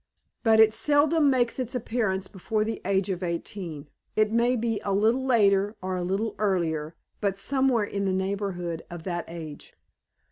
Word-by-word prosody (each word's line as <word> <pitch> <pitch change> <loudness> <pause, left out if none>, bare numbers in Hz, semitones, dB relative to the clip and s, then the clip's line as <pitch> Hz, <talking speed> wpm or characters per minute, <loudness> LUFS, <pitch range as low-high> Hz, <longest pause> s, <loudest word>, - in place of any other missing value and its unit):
"But 220 -2 +4
it 220 -1 +7
seldom 290 +6 +3
makes 250 -2 +1
its 255 0 -3
appearance 215 -5 -1
before 215 +3 -2
the 220 0 -4
age 195 0 +1
of 180 -1 -3
eighteen 170 -3 -5 0.3
it 215 0 +3
may 235 +2 +3
be 230 -2 -1
a 200 - -1
little 225 +6 +2
later 205 -4 +3
or 185 -1 -3
a 180 - -2
little 200 +4 -1
earlier, 165 -6 0 0.2
but 200 -2 -1
somewhere 260 0 +1
in 200 -1 -3
the 190 - +1
neighborhood 190 -3 -2
of 175 -2 -8
that 175 -2 -3
age. 160 -3 -9
200 Hz, 170 wpm, -26 LUFS, 185-230 Hz, 0.3 s, it